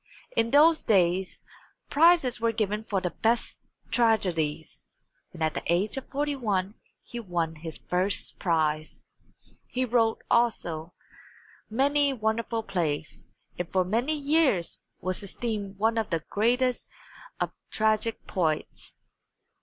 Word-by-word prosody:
In 230 - +2
those 310 +4 +6
days 185 -2 +1 0.5
prizes 310 -6 +4
were 230 0 +2
given 215 -1 -1
for 200 -3 -1
the 180 -2 -2
best 230 +7 0 0.3
tragedies, 170 -10 +1 0.5
and 165 -2 -5
at 155 -1 +1
the - - -3
age 185 +5 +1
of 270 - -6
41 245 -10 -1 0.3
he 240 - -7
won 170 -6 -2
his 160 0 -6
first 185 +3 -2
prize. 155 -3 0 0.6
He 255 +1 -1
wrote, 230 -2 +1
also, 175 -9 0 0.7
many 280 +4 +2
wonderful 225 0 -1
plays, 160 -7 -3 0.3
and 175 -1 -3
for 185 -1 +2
many 240 +11 0
years 285 - +1 0.2
was 185 +1 -2
esteemed 205 -1 -4
one 225 +2 +2
of 220 - -2
the 165 -3 -1
greatest 245 +4 +1 0.5
of - - -1 0.2
tragic 220 +1 0
poets. 160 -5 -2
215 Hz, 120 wpm, -27 LUFS, 175-240 Hz, 0.7 s, those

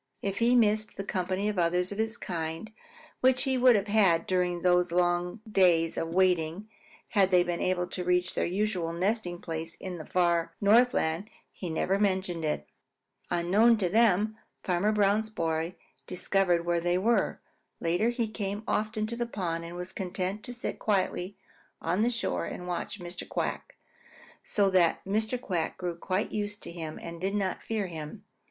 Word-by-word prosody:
If 195 -1 -2
he 235 +2 +4
missed 215 -2 +2
the 195 - -3
company 190 +1 -1
of 210 -3 -1
others 180 +2 +1
of 205 - -5
his 220 +1 -1
kind 165 +3 -4 0.5
which 255 0 +4
he 265 -1 +1
would 250 -1 +6
have 200 -1 +1
had 200 -6 +3
during 180 -2 0
these 180 0 +3
long 175 +3 +1
days 175 -5 +3
of 165 - -2
waiting 180 +1 +1 0.4
had 195 -4 +3
they 180 -2 +5
been 175 -1 -3
able 180 -1 +1
to 180 - -4
reach 180 +1 +1
their - - 0
usual 185 -3 -1
nesting 180 0 -1
place 165 -1 -5
in 180 -2 -7
the 155 - -7
far 170 -2 +1
Northland, 205 -4 +3 0.2
he 180 - -6
never 190 +4 0
mentioned 185 -4 0
it. 150 -1 -2 0.6
Unknown 205 +7 +4
to 190 -4 0
them, 215 0 +3 0.3
Farmer 185 +3 +1
Brown's 210 +1 +2
boy 165 -3 -2 0.3
discovered 180 -1 +1
where 170 -1 +1
they 175 +1 +1
were. 210 +1 +1 0.4
Later 175 +7 +1
he 240 -1 -1
came 205 -1 -4
often 215 0 0
to 235 +2 -4
the 240 0 -2
pond 170 -7 -3
and 170 +1 -8
was 180 +1 -6
content 185 +2 -3
to - - -6
sit 245 0 -5
quietly 195 -2 -1 0.4
on 175 +5 0
the 235 - +3
shore 90 - -2
and 180 - -6
watch 180 +3 -4
Mr. 175 0 -7
Quack, - - -3 0.7
so 205 -2 +2
that 175 -3 +3
Mr. 220 +5 0
Quack 175 -8 -2
grew 180 -2 -3
quite 185 +4 -2
used 205 -1 -3
to - - -7
him 160 -2 -6
and 170 0 -8
did 195 +2 -1
not 195 -2 -1
fear 220 -3 -2
him 160 -4 -6
at - - -11
all. - - -11
185 Hz, 180 wpm, -29 LUFS, 175-210 Hz, 0.7 s, would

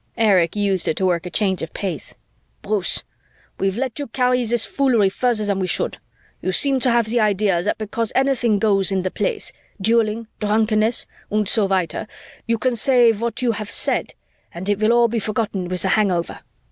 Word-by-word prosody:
Erich 190 -7 +3
used 200 -4 0
it - - 0
to 190 - 0
work 180 -1 0
a - - -5
change 190 -1 -1
of 165 - -7
pace. 185 -7 -5 0.5
"Bruce! 200 -3 +1 0.6
We've 195 +1 -1
let 260 +1 -3
you 285 - -4
carry 250 +1 +1
this 235 -1 +1
foolery 245 -8 +2
further 230 +1 0
than 200 -1 -1
we 185 - -1
should. - - -1 0.4
You 185 - -1
seem 275 +5 +4
to 255 - +2
have 235 -1 +2
the 235 +2 +1
idea 200 -4 +1
that 200 - -1
because 220 +1 -3
anything 260 -5 +2
goes 200 -2 +2
in 190 -1 0
the 185 - -2
Place 470 -4 -2 0.3
dueling, 225 +2 +1
drunkenness, 215 +1 +2 0.3
und 210 -1 0
so 210 -1 +1
weiter 185 -3 -1 0.4
you 230 0 +1
can 250 +2 0
say 240 -1 +4
what 230 +2 -3
you 240 - +2
have 210 -2 -5 0.9
and 185 +4 -4
it 205 -1 +1
will 215 +1 +3
all 240 0 +4
be 230 0 -2
forgotten 210 -3 -3
with 180 0 -1
the 190 - 0
hangover. 185 -5 0
215 Hz, 190 wpm, -20 LUFS, 195-235 Hz, 0.9 s, seem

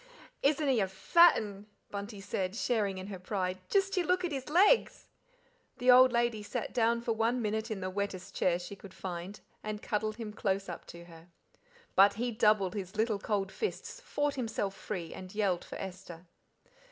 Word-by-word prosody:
"Isn't 295 +1 +2
he 260 -4 +3
a 195 - +2
fat 335 - +5
'un!" 205 -1 -6 0.2
Bunty 205 +1 -6
said, 190 0 -2
sharing 210 -5 0
in 185 - -6
her 195 -2 -7
pride; 185 -1 -2
"just 390 -1 +2
you 365 - +2
look 360 +1 +1
at 345 - -3
his 270 -1 -4
legs." 395 +9 +4 0.7
The 250 +1 +5
old 255 +1 +8
lady 235 -2 +1
sat 210 +3 -4
down 235 -1 +2
for 235 - -1
one 230 +3 +1
minute 220 0 -2
in 210 -3 -4
the 185 - -2
wettest 200 -1 -4
chair 175 -1 +2
she 180 +3 -8
could 195 -1 -13
find, 185 +2 -6 0.2
and 215 0 -5
cuddled 215 -1 -1
him 220 -2 -6
close 195 -2 -1
up 175 - -7
to 170 0 -10
her. 165 -1 -15 0.7
But 200 +1 +6
he 240 +3 -1
doubled 210 -4 +3
his 195 -1 -5
little 215 -1 +1
cold 200 -2 -1
fists, 455 +3 -4
fought 290 0 -1
himself 225 -6 -2
free, 180 -4 -5
and 185 +1 -9
yelled 195 -5 +1
for - - -9
Esther. 180 -2 -8
210 Hz, 190 wpm, -31 LUFS, 190-240 Hz, 0.7 s, old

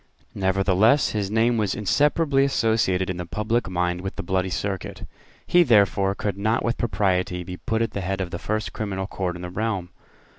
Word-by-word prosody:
Nevertheless 95 +7 +3
his 100 -3 -2
name 115 +2 +2
was 105 -3 0
inseparably 140 - +2
associated 110 -7 +1
in 95 - -3
the 90 - -4
public 110 +3 -1
mind 90 0 -1
with 95 0 -5
the - - -5
Bloody 95 +1 0
Circuit. 95 +1 -4 0.4
He, 175 - +5
therefore, 100 - +3
could 100 -2 -3
not 110 +3 +1
with 120 0 0
propriety 90 -5 0
be 90 +1 -7
put 110 +4 -1
at 115 - -2
the 100 - -4
head 95 +1 -2
of 90 -2 -3
the 85 - -4
first 110 -5 -3
criminal 95 -3 -3
court 95 -3 -3
in 90 - -8
the 90 - -6
realm. 100 -3 -2
100 Hz, 190 wpm, -24 LUFS, 95-110 Hz, 0.4 s, He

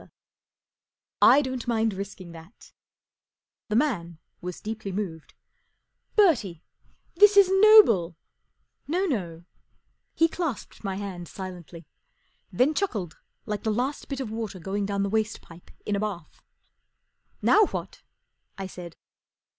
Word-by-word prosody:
r< - - -18 1.1
I 290 - +7
don't 260 -3 -5
mind 225 -2 +1
risking 190 -2 -8
that/' 165 +6 -15 1.0
The 210 - -1
man 195 - 0 0.2
was 180 0 -6
deeply 220 -2 -5
moved, 180 -5 -6 0.8
fi 425 - +7
Bertie, 210 - +1 0.5
this 415 0 +6
is 395 -2 +7
noble/' 385 - +6 0.4
" - - -49
No, 375 +2 +1
no/ 180 - -3
J - - -28 0.7
He 330 - +4
clasped 325 -10 -5
my 195 -2 -3
hand 190 -3 -6
silently, 175 -3 -9 0.7
then 255 +11 +2
chuckled 215 - -3 0.3
like 210 -2 -3
the 220 - -2
last 250 +7 -2
bit 275 -2 -4
of 250 -5 -4
water 220 -3 -5
going 195 +3 -3
down 200 -1 -1
the - - 0
waste 215 +1 -1
pipe 170 +1 -16 0.2
in 205 - -1
a - - -1
bath. 195 -7 -6 0.5
" - - -46
Now 425 -2 +5
what? - - -7 0.3
" - - -49
I 195 - -5
said. 175 -3 -9
205 Hz, 145 wpm, -26 LUFS, 180-260 Hz, 1.1 s, I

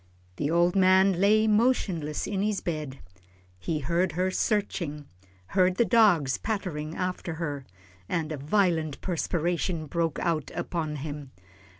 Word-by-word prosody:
The 145 - -1
old 175 +2 +3
man 190 -1 +4
lay 215 +2 +4
motionless 210 - +1
in 195 -2 -2
his 210 -1 0
bed. 155 -5 -4 0.6
He 150 - -2
heard 170 +4 0
her 185 +3 0
searching, 175 -8 -1 0.4
heard 185 -1 +3
the 235 - +3
dogs 190 - +4
pattering 170 -8 -3
after 180 -2 -3
her, 145 -5 -4 0.4
and 160 -2 -1
a 155 - -3
violent 160 -1 0
perspiration 175 -1 -1
broke 165 0 -1
out 160 -5 -1
upon 155 -3 -3
him. 145 -2 -7
170 Hz, 130 wpm, -27 LUFS, 155-190 Hz, 0.6 s, man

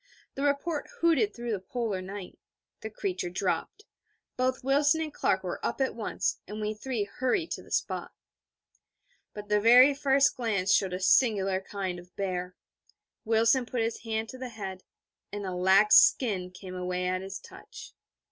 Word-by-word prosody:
The 275 - -6
report 290 +2 -1
hooted 300 -11 +3
through 235 +2 -5
the 205 - -1
Polar 205 0 -3
night. 190 0 -8 0.4
The 220 - -6
creature 190 -4 -3
dropped; 185 - -3 0.5
both 255 0 -1
Wilson 285 +4 +3
and 310 -2 -4
Clark - - 0
were - - -5
up - - -2
at 265 -1 0
once: 225 -2 -2
and 210 +1 -6
we 210 0 -2
three 225 0 -3
hurried 260 - -1
to - - -4
the - - -17
spot. - - -2 1.2
But 210 0 -8
the 210 0 +2
very 250 +5 +7
first 275 -1 +2
near - - -4
glance 195 -3 +2
showed 190 -2 +2
a 180 - -3
singular 195 -2 +3
kind 190 -2 -4
of 175 0 -17
bear. 185 -2 -3 0.7
Wilson 230 +3 +3
put 245 -2 -2
his 225 0 -2
hand 225 -1 -3
to 255 - -9
the 255 -1 -5
head, 195 -5 -7 0.5
and 205 0 -5
a 185 - -4
lax 190 +4 +5
skin 195 -8 +3
came 185 0 -10
away 180 0 -3
at 185 0 -1
his 195 0 -6
touch.... - - -12
210 Hz, 175 wpm, -28 LUFS, 190-255 Hz, 1.2 s, very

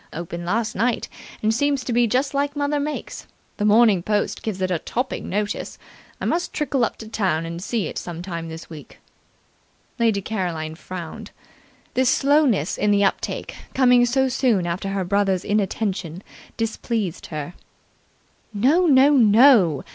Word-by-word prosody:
Opened 170 +1 -6
last 220 +3 0
night, 235 +4 0 0.4
and 215 +1 +2
seems 280 +2 0
to 245 - -3
be 240 0 +3
just 260 +5 0
like 285 +1 -1
mother 290 0 0
makes. 295 +1 -5 0.3
The 210 - -1
Morning 210 -3 +5
Post 210 +3 -1
gave 210 -4 -4
it 185 0 -1
a 170 - 0
topping 250 +9 -4
notice. 205 +1 -3 0.4
I - - -4
must 345 +1 -1
trickle 275 -4 0
up 230 - -1
to 220 - -9
town 185 -7 -1
and 170 +1 -6
see 215 0 -2
it - - -4
some 175 -1 -7
time 170 -3 -5
this 160 0 -9
week." 155 -3 -12 1.0
Lady 225 -3 +2
Caroline 175 -7 -3
frowned. 185 +5 -8 0.6
This 255 0 +2
slowness 275 - +2
in 210 - +2
the 205 0 +3
uptake, 195 - -2 0.2
coming 250 -2 +5
so 265 +2 +2
soon 245 -8 +1
after 175 +3 -3
her 195 -1 -1
brother's 195 -1 +1
inattention, 195 -4 -2 0.3
displeased 225 -4 -3
her. 155 +1 -6 1.0
"No, 295 - +3
no, 275 -1 +6
no. 225 - +5
210 Hz, 155 wpm, -22 LUFS, 180-250 Hz, 1.0 s, no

